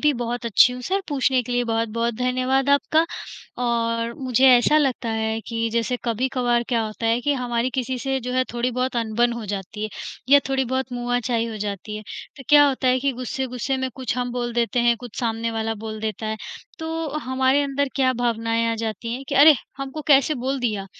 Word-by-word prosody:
भी 300 -1 +4
बहुत 240 +1 -3
अच्छी 235 +3 +5
हूँ, 250 - -7
सर 390 +9 0
पूछने 265 -3 +2
के 245 - -5
लिए 245 0 +1
बहुत-बहुत 230 0 -1
धन्यवाद 255 +3 0
आपका 310 +3 +3 0.6
और 230 -1 0
मुझे 260 0 +2
ऐसा 250 +4 +6
लगता 265 -5 0
है 220 0 -1
कि, 230 0 -2
जैसे 235 +2 0
कभी-कभार 245 0 +1
क्या 235 -3 +1
होता 215 +2 -4
है 230 +2 +2
कि 290 +3 +1
हमारी 245 -1 -1
किसी 255 0 -2
से 270 +1 -1
जो 250 +1 -4
है 255 0 +2
थोड़ी 240 +1 0
बहुत 255 +1 -2
अनबन 235 +1 +1
हो 235 -2 -5
जाती 200 +1 -5
है - - -2 0.4
या 285 - +8
थोड़ी 265 0 +1
बहुत 260 +1 -2
मुआचाई 245 -1 -1
हो 225 -1 -5
जाती 210 +1 -4
है, 215 - -7 0.3
तो 275 - -10
क्या 290 0 +7
होता 260 -1 0
है 255 +1 +3
कि 275 +1 +1
गुस्से-गुस्से 255 +1 -3
में 260 0 -2
कुछ 260 -2 -3
हम 245 -1 -2
बोल 240 -1 -2
देते 240 +1 +1
हैं, 235 0 +3
कुछ 240 -2 -10
सामने 230 -1 -1
वाला 225 0 -2
बोल 215 -1 -5
देता 220 0 -3
है, 220 0 -2 0.4
तो 325 0 -3
हमारे 260 0 +1
अंदर 280 0 -1
क्या 260 -2 +3
भावनाएँ 230 -1 0
आ - - -1
जाती 225 +1 -4
हैं 260 - -6
कि 285 - -2
"अरे! 295 +3 +8 0.2
हमको 275 +3 -5
कैसे 280 +1 +5
बोल 265 +1 -2
दिया? 210 -5 -2
245 Hz, 210 wpm, -23 LUFS, 230-265 Hz, 0.6 s, या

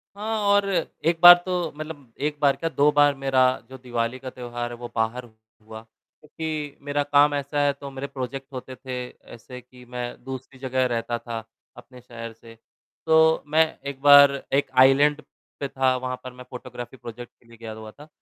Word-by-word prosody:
हाँ, 220 +2 -3
और 200 0 +4 0.4
एक 165 0 +2
बार 175 0 +13
तो 180 -3 -2
मतलब 150 -6 -9
एक 150 0 -5
बार 140 -2 +4
क्या 165 - -3
2 150 -1 +3
बार 145 -1 +5
मेरा 135 -1 +1 0.3
जो 130 - -10
दिवाली 120 -1 -3
का 130 0 -7
त्योहार 120 -1 -6
है - - -6
वो 120 0 -7
बाहर 115 +2 -1
हुआ 110 -1 -15
क्योंकि 150 +5 -8
मेरा 145 0 0
काम 145 +1 +4
ऐसा 140 +1 -2
है 140 - +2
तो 140 0 -9
मेरे 135 +1 -6
प्रोजेक्ट 135 0 -6
होते 130 0 -7
थे 130 0 -7 0.4
ऐसे 125 +2 -11
कि 125 0 -18
मैं 125 0 -5 0.2
दूसरी 130 0 -8
जगह 130 -1 0
रहता 120 +1 -2
था 115 -2 -6 0.3
अपने 125 -1 -14
शहर 115 -1 -9
से, 115 0 -16 0.5
तो 160 0 +4
मैं 160 +2 +4 0.2
एक 140 -1 -6
बार 145 0 +8 0.2
एक 135 -1 +1
आइलैंड 145 +3 +3 0.4
पे 140 - -2
था, 130 -1 +1
वहाँ 125 0 -4
पर 130 -1 -8
मैं 125 0 -11
फ़ोटोग्राफ़ी 125 0 -9
प्रोजेक्ट 120 0 -10
के 120 - -26
लिए 115 0 -16
गया 115 -1 -8
हुआ 110 0 -10
था, 145 +6 -15
130 Hz, 190 wpm, -24 LUFS, 120-145 Hz, 0.5 s, बार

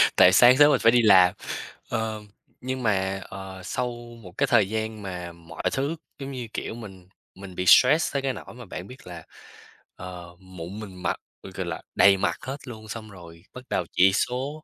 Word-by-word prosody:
tại 90 - +7
sáng 125 +6 +7
sớm 145 0 +7
mình - - +3
phải 115 - +7
đi 120 0 +4
làm. 95 -5 +6 0.6
Ờ, 110 -2 -2 0.4
nhưng 130 0 -4
mà, 95 -2 0
ờ, 95 -1 -9
sau 125 +7 -2 0.3
một 90 - -11
cái - - +2
thời 105 -5 +3
gian 110 -1 -3
mà 90 -3 -6
mọi 85 -1 -11
thứ, 140 +5 -1 0.2
giống 135 0 -6
như, 125 -3 -6
kiểu, - - -4
mình 95 -6 -11 0.3
mình 95 -1 -11
bị 90 - -2
stress 150 +6 +6
tới 140 - 0
cái 135 -1 -1
nỗi - - -10
mà 120 -1 -11
bạn 90 +1 -8
biết 130 -6 -13
là, 85 -2 -9 0.7
ờ, 90 -1 -9
mụn 95 +1 -9
mình 100 -4 -9
mặt, - - 0 0.3
ừ, 95 - -10
gọi 95 -1 -4
là, 85 -1 -5
đầy 100 0 +6
mặt 85 -2 0
hết 135 +2 -5
luôn, 110 -2 -9
xong 110 0 -7
rồi 85 -3 -13
bắt 125 - -9
đầu 90 - -1
chỉ 95 +2 +5
số 135 - -2
100 Hz, 205 wpm, -25 LUFS, 90-125 Hz, 0.7 s, tại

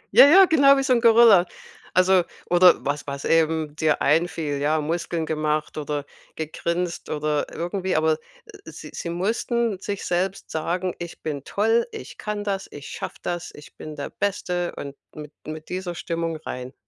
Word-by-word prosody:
Jaja, 305 +10 +9
genau 275 -4 +5
wie 270 - +1
so 255 - +3
'n 235 - +2
Gorilla, 225 -6 +7 0.5
also, 185 0 +5 0.2
oder 175 0 +5
was 145 +1 -2
was 140 0 -5
eben 160 -2 +1
dir 155 -1 +1
einfiel, 155 -2 +1
ja, 155 +2 +1
Muskeln 165 +1 -2
gemacht 155 -1 -1
oder 145 -1 -3 0.3
gegrinst 170 +2 -3
oder 150 -1 -1
irgendwie, 180 +2 -2
aber 155 0 +2 0.5
sie - - -10
sie 170 - -5
mussten 220 +3 -1
sich 200 0 -5
selbst 185 +2 -2
sagen: 175 +3 -2
„Ich 175 -1 -8
bin 145 -3 -4
toll, 225 +3 +1
ich - - -9
kann 210 -1 -3
das, 195 -1 -3
ich 145 -1 -10
schaffe - - -6
das, 175 -1 -4
ich 150 - -14
bin 155 -1 -8
der 140 - -6
Beste.“ 180 -3 -2
Und 140 0 -7 0.2
mit 150 -1 -9
mit 155 0 -7
dieser 180 -1 -4
Stimmung 165 -1 -3
rein, 125 +1 -6
170 Hz, 165 wpm, -24 LUFS, 155-195 Hz, 0.5 s, Jaja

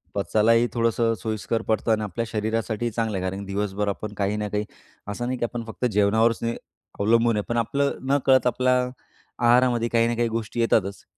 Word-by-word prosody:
पचायलाही 115 +4 +3
थोडंसं 115 -1 +1
सोयीस्कर 110 0 -2
पडतो 110 +1 +1
आणि 110 -1 +1
आपल्या 105 +4 -3
शरीरासाठी 110 +1 -2
चांगलं 110 -3 -2
आहे. 90 - -3
कारण 95 +1 -3
की 100 - -7
दिवसभर 105 0 -1
आपण 105 +1 -5
काही 100 +1 0
ना 105 0 -2
काही 105 +1 -2 0.4
असं, 110 +4 -4
नाही 130 0 -2
की 120 - +1
आपण 120 0 -5
फक्त 120 +2 -4
जेवणावरच 110 +3 +3 0.6
अवलंबून 115 +2 +3
आहे, 105 - -1
पण 120 - 0
आपलं 140 +5 0
नकळत 135 -2 +4
आपल्या 125 +1 +2 0.7
आहारामध्ये 120 -1 +4
काही 115 0 +3
ना 120 - -1
काही 120 0 +1
गोष्टी 115 +1 -4
येतातच, 100 -4 +1
115 Hz, 185 wpm, -24 LUFS, 105-120 Hz, 0.7 s, नकळत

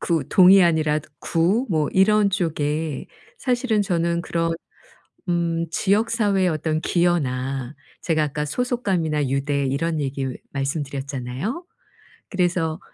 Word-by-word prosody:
구, 165 -6 0
동이 190 +1 +7
아니랏 155 -3 +2 0.2
구 190 +10 +1
뭐 155 -4 +1
이런 205 +1 +4
쪽에 155 -4 -2 0.3
사실은 245 - +1
저는 170 -2 0
그런 165 -1 -1 0.7
음 170 -1 0
지역 205 +6 +1
사회의 205 -5 +2
어떤 155 -1 -1
기여나 135 -7 0 0.3
제가 155 -2 +1
아까 150 +1 -3
소속감이나 175 - -1
유대 140 +1 0
이런 155 +4 -1
얘기 135 -1 -2 0.2
말씀드렸잖아요. 140 - -4 0.6
그래서 175 -3 0
165 Hz, 255 characters per minute, -23 LUFS, 145-190 Hz, 0.7 s, 동이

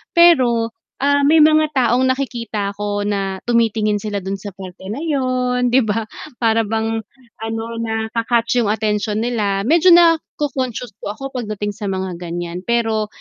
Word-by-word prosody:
pero 250 -10 +5 0.3
ah, 285 +1 +2
may 300 +3 +4
mga 310 0 +5
taong 255 +1 +3
nakikita 230 -6 -2
ko 205 0 -3
na 195 -2 -2
tumitingin 220 -3 +1
sila 210 -1 -3
dun 195 0 -4
sa 205 - -6
parte 185 -1 -10
na 220 - -4
yun, 255 -4 0
'di 250 -1 +3
ba. 220 +2 -1 0.4
Para 225 0 +2
bang, 225 +1 -1 0.4
ano, 225 0 -3 0.2
naka-catch 230 +1 -1
yung 205 - 0
atensyon 210 0 -1
nila, 210 -5 0
medyo 335 - +5
naco-conscious 290 -8 +1
po 205 - -5
ako 270 +4 -7
pagdating 210 -3 -3
sa 205 +1 -7
mga 190 -2 -3
ganyan, 175 0 -5
pero 225 -2 0
225 Hz, 150 wpm, -19 LUFS, 205-255 Hz, 0.4 s, pero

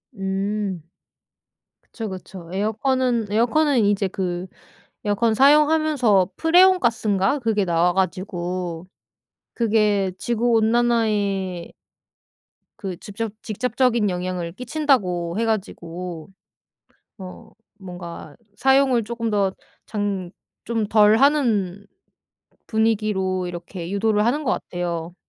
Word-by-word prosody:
음. 195 -1 -2 1.0
그쵸, 225 -3 -7
그쵸. 185 -2 -9
에어컨은 230 +4 0
에어컨은 245 +2 +2
이제 200 -1 +1
그 180 -1 -3 0.6
에어컨 220 +2 +2
사용하면서 285 - +4
프레온 365 +3 +5
가스인가 220 - +1
그게 220 -5 0
나와 175 0 +2
가지고 180 -2 -3 0.7
그게 210 -4 +1
지구 235 +4 -1
온난화에 215 -6 +1 1.1
그 190 -3 -4
직접 210 +3 -5
직접적인 235 0 0
영향을 180 -2 -3
끼친다고 210 - 0
해 230 - +1
가지고 180 -6 -4 0.9
어 185 -2 -11 0.3
뭔가 175 -5 -9 0.2
사용을 265 -3 +3
쪼끔 230 +1 -3
더 200 -2 +1 0.3
장 200 -4 -3 0.3
좀 225 -2 -1
덜 210 0 +5
하는 225 -9 +1 0.8
분위기로 210 -4 0
이렇게 175 0 -7
유도를 210 +1 +1
하는 290 +6 0
것 245 - +1
같아요. 175 -1 -4
205 Hz, 225 characters per minute, -22 LUFS, 185-235 Hz, 1.1 s, 프레온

